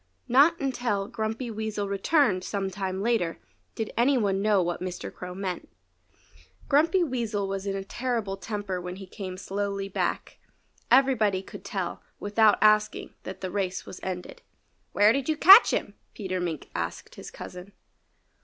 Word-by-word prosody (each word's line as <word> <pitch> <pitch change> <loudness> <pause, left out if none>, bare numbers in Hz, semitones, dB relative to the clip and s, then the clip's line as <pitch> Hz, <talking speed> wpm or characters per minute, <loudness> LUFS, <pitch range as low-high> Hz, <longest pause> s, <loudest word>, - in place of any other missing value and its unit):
Not 285 +7 +5
until 245 -7 -1
Grumpy 225 +3 -3
Weasel 215 -2 -3
returned 200 - +2
some 195 0 -3
time 190 0 -3
later 220 -8 0 0.4
did 220 -2 -4
any 260 +3 +3
one 195 -4 +1
know 210 -1 +3
what 175 0 -3
Mr. 180 -1 -5
Crow 180 0 -8
meant. 190 -2 -4 1.0
Grumpy 325 +6 +3
Weasel 230 -8 -2
was 195 0 -4
in 195 - -1
a 195 - -3
terrible 230 -2 -2
temper 200 -2 -4
when 180 0 -6
he 195 0 -9
came 185 0 -7
slowly 200 0 -3
back. 195 - -3 0.5
Everybody 230 -7 +3
could - - -11
tell, - - -4 0.2
without 210 +1 +4
asking, 215 0 +3
that - - -7
the 185 -1 -4
race 190 -2 -2
was - - -9
ended. 185 - -6 0.5
"Where 210 +2 +5
did 275 +1 -2
you 310 - +1
catch 390 +8 +9
him?" - - -2 0.2
Peter 185 -3 -3
Mink 170 -4 -4
asked - - -4
his - - -9
cousin. 180 +2 -10
205 Hz, 155 wpm, -27 LUFS, 190-235 Hz, 1.0 s, catch